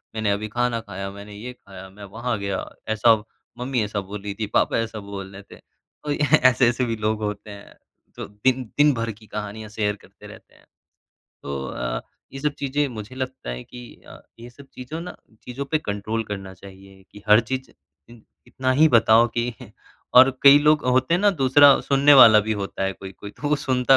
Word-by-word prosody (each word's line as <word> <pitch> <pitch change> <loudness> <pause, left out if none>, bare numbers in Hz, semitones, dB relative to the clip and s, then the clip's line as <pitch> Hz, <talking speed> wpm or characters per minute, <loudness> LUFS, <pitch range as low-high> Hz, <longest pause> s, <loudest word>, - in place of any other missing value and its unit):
मैंने 110 -2 0
अभी 105 +2 -2
खाना 120 +1 -1
खाया, 100 -2 -7
मैंने 100 +1 -11
ये 120 +5 -8
खाया, 95 -5 -13
मैं 100 +2 -14
वहाँ 115 +3 -4
गया, 100 -1 -3 0.2
ऐसा 110 +1 +4 0.4
मम्मी 125 0 -2
ऐसा 105 0 -3
बोल 100 +1 -8
रही 100 0 -5
थी, 110 - -2
पापा 105 - +1
ऐसा 115 -1 -3
बोल 100 -1 -8
रहे 100 - -11
थे। - - -18 0.5
और 145 - -1
ऐसे-ऐसे 130 -4 +3
भी 115 -1 -2
लोग 110 0 -2
होते 105 0 -5
हैं। 100 0 -13 0.4
तो - - -6
दिन 125 +6 -1
दिन 145 0 +5
भर 115 -2 -3
की 110 +1 -16
कहानियाँ 105 +1 -7
शेयर 105 -1 -2
करते - - -17
रहते - - -16
हैं। - - -24 0.8
तो 70 -1 -5
अ, - - -4 0.3
ये 135 - -7
सब 150 +1 0
चीज़ें 145 +1 -1
मुझे 110 -1 -9
लगता 130 - -5
है - - -6
कि 125 -1 -13
अ, - - -13 0.2
ये 120 +1 -11
सब 140 +3 -16
चीज़ों 130 +6 -7
ना 180 +1 -8 0.3
चीज़ों 125 +3 -6
पे 155 +3 -1
कंट्रोल 110 -2 -3
करना 95 -2 -7
चाहिए। 95 +1 -15
कि 105 - -13
हर 105 +2 +7
चीज़ 130 +3 -5
इ 75 - -21 0.3
इतना 130 0 -2
ही 150 +5 +5
बताओ 115 -2 +5
कि 120 +1 -1 0.6
और 130 +1 +9
कई 140 +1 +9
लोग 150 0 +3
होते 130 +5 +2
हैं 175 - +1
ना 205 0 +4
दूसरा 140 +1 +6
सुनने 140 +1 +4
वाला 110 -5 +8
भी 110 +1 -2
होता 100 -2 -4
है 95 0 0
कोई-कोई 95 +1 -11
तो 145 - -5
वो 150 - +2
सुनता 130 -1 +2
115 Hz, 200 wpm, -22 LUFS, 100-130 Hz, 0.8 s, और